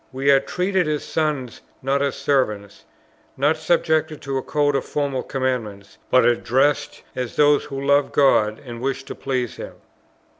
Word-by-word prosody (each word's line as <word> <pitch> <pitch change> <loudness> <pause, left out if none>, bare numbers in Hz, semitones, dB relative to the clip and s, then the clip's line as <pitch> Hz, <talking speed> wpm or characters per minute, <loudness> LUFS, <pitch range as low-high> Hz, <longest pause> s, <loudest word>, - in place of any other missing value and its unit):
We 135 +2 +2
are 135 - +6
treated 180 +4 -1
as 150 -1 -1
sons, 150 -6 -2 0.2
not 135 +1 +1
as 140 -2 0
servants; 105 -8 -1 0.5
not 145 +4 +2
subjected 155 -1 0
to 135 0 -2
a - - -4
code 145 +1 0
of 135 - 0
formal 140 -3 -2
commandments, 115 -7 -4
but 130 - +4
addressed 130 +4 +1
as 125 -2 -4
those 145 -1 +4
who 135 - -6
love 140 0 +3
God, 110 -6 +3
and 120 -1 -8
wish 135 +1 -2
to - - -7
please 125 -3 -3
Him." - - -8
135 Hz, 160 wpm, -22 LUFS, 125-145 Hz, 0.5 s, are